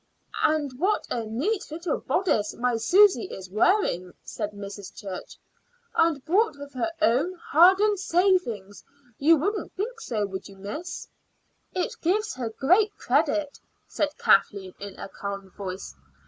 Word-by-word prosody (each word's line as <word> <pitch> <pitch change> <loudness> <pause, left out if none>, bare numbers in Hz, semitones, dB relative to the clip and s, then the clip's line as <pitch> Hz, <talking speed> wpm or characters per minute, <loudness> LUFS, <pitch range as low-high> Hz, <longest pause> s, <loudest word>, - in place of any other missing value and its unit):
"And 290 -4 +1
what 400 +5 +1
a 230 -2 -2
neat 320 - -2
little 325 +1 -3
bodice 265 - 0
my 245 -1 0
Susy 385 - +5
is 190 - -9
wearing!" 205 - +2
said 210 -2 -4
Mrs. 200 -1 -9
Church. 195 -3 -8 0.6
"And 325 -5 +2
bought 370 0 +2
with 285 0 -10
her 270 +6 -1
own 280 +11 +2
hard 350 +3 +5
earned 420 -1 +2
savings. 335 - +1 0.4
You 320 +3 +6
wouldn't 405 +8 -2
think 455 +5 -4
so, 215 - -1
would 190 -1 -6
you, 195 - -13
miss?" 210 - -6 0.7
"It 360 -1 -2
gives 420 +6 +1
her 245 -3 -4
great 375 - +2
credit," 290 +2 0 0.3
said 300 -1 -2
Kathleen 195 -1 +2
in 200 -1 -8
a - - -6
calm 200 -1 -6
voice. 185 - -7
285 Hz, 145 wpm, -26 LUFS, -, 0.7 s, You